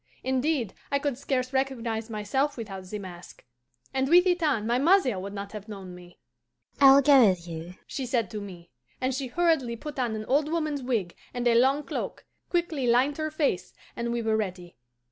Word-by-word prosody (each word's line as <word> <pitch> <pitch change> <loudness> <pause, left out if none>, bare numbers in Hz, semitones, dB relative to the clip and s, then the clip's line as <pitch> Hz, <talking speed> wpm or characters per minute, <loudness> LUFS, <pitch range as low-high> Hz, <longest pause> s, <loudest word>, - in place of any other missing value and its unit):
Indeed, 260 -3 0 0.2
I 280 - +3
could 280 -2 -1
scarce 255 0 -2
recognize 240 -4 -1
myself 245 +7 -1
without 195 -5 -6
the 210 +3 -5
mask, 180 -3 -11 0.5
and 265 0 0
with 355 +2 +7
it 355 -1 +2
on 275 -9 +1
my 240 +2 +1
mother 280 - +3
would 195 +2 -6
not 200 0 -6
have 210 0 -8
known 195 -3 -8
me. 175 0 -14 0.6
'I 270 -1 +9
will 280 - +6
go 270 -5 +7
with 175 -2 -2
you,' 165 +2 -7
she 265 -2 -4
said 230 -6 0
to 210 - -5
me, 175 -4 -10 0.3
and 260 +1 0
she 265 +1 -3
hurriedly 275 -4 +1
put 295 +4 -7
on 240 -3 0
an 215 0 -5
old 290 +5 +2
woman's 305 -4 -1
wig 225 -9 -2 0.2
and 245 0 0
a 235 - +5
long 265 +5 +4
cloak, - - -5 0.2
quickly 335 -7 0
lined 255 +5 +3
her 310 0 -1
face, 285 - -1 0.2
and 235 0 -2
we 235 -1 -1
were 220 0 +1
ready. 185 -5 -4
245 Hz, 200 wpm, -27 LUFS, 205-280 Hz, 0.6 s, I